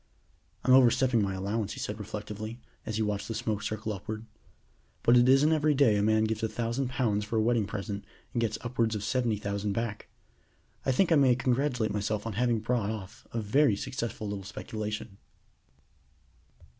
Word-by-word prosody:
"I'm 130 - +5
overstepping 125 -2 +5
my 95 -1 -1
allowance," 100 +2 -2
he - - -8
said 105 +1 -4
reflectively, 105 +2 -6 0.3
as 110 - -2
he 110 - +1
watched 100 -1 -2
the 115 - -4
smoke 110 -3 -2
circle 110 +1 -3
upward, 110 +3 -6 0.8
"but 120 - +6
it 120 +1 +6
isn't 135 +4 +5
every 155 -1 +2
day 130 -6 +5
a 100 - +2
man 110 +1 +3
gives 110 0 -1
a 110 - 0
thousand 120 +4 -2
pounds 110 -5 0
for 105 +2 -4
a - - +4
wedding 115 -3 +2
present 100 0 -4 0.3
and 120 - 0
gets 110 -2 0
upwards 115 -2 0
of 105 - -3
seventy 120 -2 0
thousand 100 0 -2
back. 115 -1 -3 0.8
I - - +4
think 170 +7 +2
I - - +7
may 130 -3 +5
congratulate 125 -3 0
myself 105 +1 -1
on 115 - -3
having 120 +1 +1
brought 115 -2 0
off 105 -4 -7
a 115 - -2
very 110 +2 +3
successful 115 0 -4
little 100 -1 -4
speculation." 105 +1 -5
110 Hz, 180 wpm, -29 LUFS, 105-120 Hz, 0.8 s, I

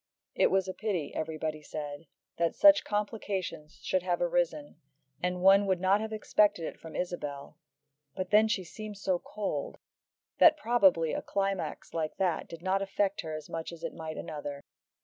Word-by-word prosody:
It - - +3
was 190 -1 +2
a 185 - -3
pity, 185 -10 -2
everybody 155 -1 -3
said, 150 +1 -7 0.3
that 170 -1 +1
such 300 0 +7
complications 200 -7 -3
should 185 - +1
have 175 -1 -1
arisen, 170 -4 0 0.4
and 180 0 -1
one 195 +1 +6
would 190 -2 +2
not 190 +3 +3
have 220 0 -4
expected 210 -4 +2
it - - -7
from 160 -1 -10
Isabel, 150 -4 -5 0.6
but 185 -1 -4
then 215 +1 +6
she 210 -4 0
seemed 210 +3 -8
so 190 -2 0
cold, 215 - -4 0.6
that 315 -2 +8
probably 190 - +3
a - - -2
climax 195 -1 -2
like 160 -2 -2
that 180 -4 0
did 165 0 -9
not 190 +1 +1
affect 195 0 0
her 160 -2 -5
as 155 - -7
much 165 0 -5
as 170 -1 -11
it - - -3
might 160 -1 -6
another. 145 -2 -6
180 Hz, 170 wpm, -30 LUFS, 160-200 Hz, 0.6 s, that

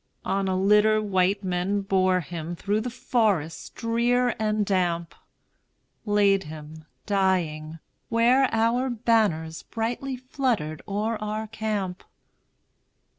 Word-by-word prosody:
On 195 0 0
a 185 0 0
litter 210 +2 +4
white 200 -1 +1
men 185 +2 0
bore 185 -2 +2
him 170 0 -6
Through 205 +5 -1
the 250 - -3
forest 210 - -1
drear 240 +2 +1
and 215 -1 +1
damp, 175 -3 0 0.9
Laid 200 -2 +3
him, 155 0 -10 0.2
dying, 175 -6 0 0.3
where 245 +3 +4
our 230 +3 +1
banners 215 -9 +1
Brightly 245 +4 -3
fluttered 245 - -2
o'er 215 +3 -1
our 215 +1 -3
camp. 210 -4 -3
205 Hz, 110 wpm, -25 LUFS, 180-225 Hz, 0.9 s, litter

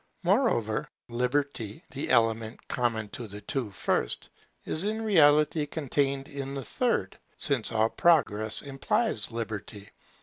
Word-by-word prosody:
Moreover, 175 - +2 0.2
Liberty, 125 -2 -1
the 135 +2 -4
element 115 -2 +1
common 115 -3 0
to 120 +1 -6
the 105 0 -8
two 120 +2 -2
first, 95 -9 -1 0.3
is 160 - -1
in 220 +2 -1
reality 150 -5 +4
contained 140 -2 -1
in 140 -2 -5
the 135 - -4
third; 245 -2 -1 0.2
since 135 -6 +1
all 110 0 +3
Progress 110 -12 +2
implies 135 - -1
Liberty. 110 -3 -6
135 Hz, 125 wpm, -28 LUFS, 110-150 Hz, 0.3 s, reality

